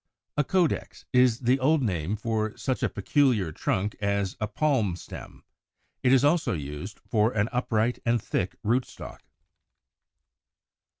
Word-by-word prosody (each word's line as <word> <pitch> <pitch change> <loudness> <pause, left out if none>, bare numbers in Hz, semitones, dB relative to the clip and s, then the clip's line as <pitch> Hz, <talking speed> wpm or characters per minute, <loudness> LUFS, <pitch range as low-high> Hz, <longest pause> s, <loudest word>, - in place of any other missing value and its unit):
93. 150 - +3
=A - - -3 0.3
Caudex= - - -9
is 125 -2 +4
the 125 +2 +2
old 145 +2 +3
name 90 -3 -1
for 110 0 -2
such 130 -2 -2
a - - +1
peculiar 125 - +1
trunk 100 +6 -1
as 100 -1 0
a 105 - 0
Palm 125 - +1
stem; - - -10 0.6
it 125 - +3
is 135 +1 +5
also 155 - +2
used 75 +5 -6
for 110 0 +2
an 105 0 +1
upright 120 -1 0
and 120 0 +2
thick 95 -3 -2
rootstock. 120 +4 -2
110 Hz, 140 wpm, -27 LUFS, 100-130 Hz, 0.6 s, is